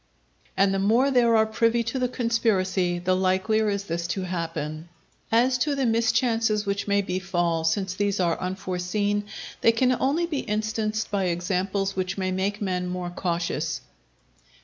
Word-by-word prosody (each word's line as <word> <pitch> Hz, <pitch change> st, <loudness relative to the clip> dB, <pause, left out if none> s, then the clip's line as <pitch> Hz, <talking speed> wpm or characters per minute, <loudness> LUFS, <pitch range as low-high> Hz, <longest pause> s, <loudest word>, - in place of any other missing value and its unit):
And 195 Hz, 0 st, +3 dB
the 195 Hz, -, 0 dB
more 230 Hz, +8 st, +3 dB
there 240 Hz, -3 st, +4 dB
are 220 Hz, 0 st, +5 dB
privy 230 Hz, +2 st, +1 dB
to 235 Hz, +3 st, -3 dB
the 250 Hz, -, +1 dB
conspiracy, 200 Hz, -7 st, 0 dB
the 185 Hz, +1 st, +1 dB
likelier 190 Hz, +4 st, +1 dB
is 200 Hz, -1 st, -1 dB
this 170 Hz, -2 st, -3 dB
to 185 Hz, +2 st, -2 dB
happen. 165 Hz, -3 st, -4 dB, 0.4 s
As 250 Hz, +3 st, +3 dB
to 290 Hz, +2 st, +1 dB
the 275 Hz, -1 st, 0 dB
mischances 225 Hz, -1 st, +2 dB
which 200 Hz, +1 st, -2 dB
may 200 Hz, 0 st, +2 dB
befall, 175 Hz, -3 st, -1 dB
since 180 Hz, +3 st, 0 dB
these 200 Hz, +1 st, -1 dB
are 170 Hz, -2 st, +1 dB
unforeseen, 190 Hz, +2 st, -2 dB, 0.4 s
they 230 Hz, -, +6 dB
can 250 Hz, +3 st, +2 dB
only 275 Hz, +7 st, +1 dB
be 310 Hz, -5 st, -2 dB
instanced 215 Hz, +1 st, -1 dB
by 200 Hz, -2 st, 0 dB
examples 190 Hz, +3 st, -1 dB
which 185 Hz, 0 st, -2 dB
may 185 Hz, -1 st, -1 dB
make 200 Hz, +3 st, -1 dB
men 180 Hz, -2 st, -1 dB
more 180 Hz, -1 st, -4 dB
cautious. 175 Hz, -1 st, -2 dB
200 Hz, 160 wpm, -25 LUFS, 185-225 Hz, 0.4 s, they